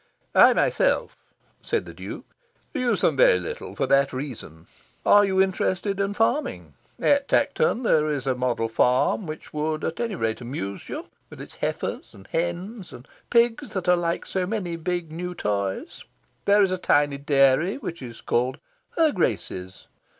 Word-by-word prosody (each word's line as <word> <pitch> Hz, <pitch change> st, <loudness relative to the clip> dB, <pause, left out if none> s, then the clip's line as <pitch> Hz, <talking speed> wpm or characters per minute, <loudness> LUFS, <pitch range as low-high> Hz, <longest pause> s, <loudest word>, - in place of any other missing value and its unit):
"I -, -, +7 dB
myself," -, -, +1 dB, 0.5 s
said -, -, -1 dB
the -, -, -10 dB
Duke, -, -, -8 dB, 0.5 s
"use 250 Hz, -8 st, 0 dB
them 145 Hz, -, +2 dB
little 90 Hz, -8 st, +2 dB
for -, -, 0 dB
that 140 Hz, 0 st, +3 dB
very 130 Hz, +1 st, -4 dB
reason. 80 Hz, -, -11 dB, 0.4 s
Are 205 Hz, 0 st, +7 dB
you 190 Hz, -1 st, +1 dB
interested 190 Hz, +1 st, 0 dB
in 200 Hz, +1 st, -1 dB
farming? 240 Hz, +7 st, -1 dB, 0.3 s
At 285 Hz, -1 st, +3 dB
Tankerton 475 Hz, -, +1 dB
there 155 Hz, -8 st, +3 dB
is 140 Hz, -3 st, -2 dB
a 130 Hz, -, +2 dB
model 125 Hz, -2 st, -1 dB
farm 125 Hz, -, +2 dB
which 155 Hz, 0 st, -8 dB
would 155 Hz, +1 st, -2 dB
at 165 Hz, -, -3 dB
any 230 Hz, -4 st, -2 dB
rate 110 Hz, -5 st, -2 dB
amuse 110 Hz, -6 st, -6 dB
you, -, -, -5 dB, 0.2 s
with -, -, -12 dB
its -, -, -11 dB
heifers -, -, -4 dB
and 95 Hz, -, -14 dB
hens 175 Hz, +5 st, -3 dB
and 125 Hz, -, -12 dB, 0.2 s
pigs 240 Hz, +3 st, +2 dB
that 190 Hz, -2 st, -3 dB
are 180 Hz, -, +6 dB
like 170 Hz, -1 st, -2 dB
so 185 Hz, -1 st, -2 dB
many 185 Hz, -5 st, -3 dB
big 170 Hz, -1 st, -3 dB
new 180 Hz, +2 st, -5 dB
toys. 100 Hz, -, -3 dB, 0.4 s
There 205 Hz, 0 st, +5 dB
is 190 Hz, -, +1 dB
a 185 Hz, -, -1 dB
tiny 145 Hz, -4 st, +2 dB
dairy, 140 Hz, +5 st, +3 dB
which 170 Hz, -, -6 dB
is 120 Hz, -3 st, -9 dB
called 125 Hz, +3 st, 0 dB, 0.4 s
'Her 320 Hz, -2 st, +4 dB
Grace's. 95 Hz, -, -2 dB
170 Hz, 165 wpm, -24 LUFS, 130-200 Hz, 0.5 s, I